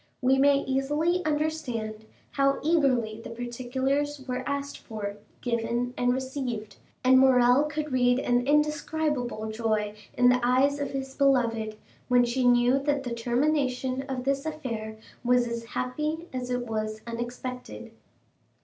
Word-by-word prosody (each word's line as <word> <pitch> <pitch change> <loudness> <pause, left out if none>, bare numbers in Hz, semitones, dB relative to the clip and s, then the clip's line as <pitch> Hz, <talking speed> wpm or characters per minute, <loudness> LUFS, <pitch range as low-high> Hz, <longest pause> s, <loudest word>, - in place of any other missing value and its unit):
We 265 +1 +3
may 280 0 +5
easily 295 +7 0
understand 270 -9 -2 0.3
how 275 0 +2
eagerly 255 -9 +2
the - - -7
particulars 260 +4 -2
were 250 0 -2
asked 280 0 -3
for, 205 -3 -6 0.2
given, 235 +1 -1
and 245 0 +2
received; 255 -4 -4 0.3
and 260 +1 +6
Morrel 255 +1 +5
could 300 0 -4
read 245 -1 +3
an 245 -1 +1
indescribable 295 -6 0
joy 215 -2 -1 0.2
in 245 0 +6
the 250 0 +4
eyes 260 +4 +3
of 285 -1 -2
his 270 -1 -5
beloved, 235 -6 +1 0.3
when 245 -1 +4
she 245 +1 +1
knew 245 +2 +4
that 280 0 0
the 245 -2 -3
termination 255 +1 0
of 255 -2 -3
this 275 +1 0
affair 230 -9 -5 0.3
was 245 0 +3
as 235 0 -4
happy 300 +7 -3
as 250 -1 -4
it 245 -1 -1
was 215 -1 -3
unexpected. 240 0 -6
255 Hz, 140 wpm, -27 LUFS, 240-280 Hz, 0.3 s, and